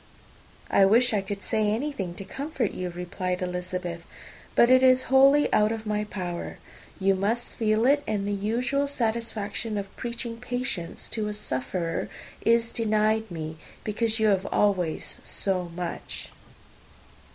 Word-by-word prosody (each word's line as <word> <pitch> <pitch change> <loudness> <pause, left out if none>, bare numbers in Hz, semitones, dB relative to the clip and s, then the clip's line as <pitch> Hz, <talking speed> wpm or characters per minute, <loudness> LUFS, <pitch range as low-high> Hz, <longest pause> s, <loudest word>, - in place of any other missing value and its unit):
"I 195 - +6
wish 230 +5 +5
I 205 - +2
could 200 +1 -6
say 215 -1 +1
anything 215 -6 -2
to 195 - -7
comfort 275 -1 -2
you," 180 -1 -4
replied 180 +1 -3
Elizabeth; 180 -1 -4 0.5
"but 240 - +6
it 255 0 +7
is 260 0 +6
wholly 275 +2 +7
out 210 +1 +4
of 225 -1 -4
my 210 0 -1
power. 180 -4 -5 0.4
You 195 0 +3
must 215 +6 -1
feel 220 0 +2
it; 285 +2 +4
and 200 -2 -1
the - - -1
usual 240 +8 0
satisfaction 225 -4 -2
of 200 -1 -5
preaching 235 -1 -4
patience 245 -8 -3
to 215 -2 -2
a 210 - -2
sufferer 165 -1 -1 0.3
is 230 0 +3
denied 220 0 +1
me, 160 -2 -5 0.3
because 220 +1 0
you 220 -1 +4
have 195 -1 +1
always 185 -6 0
so 185 -3 0
much." 175 -1 -5
210 Hz, 145 wpm, -26 LUFS, 185-235 Hz, 0.5 s, it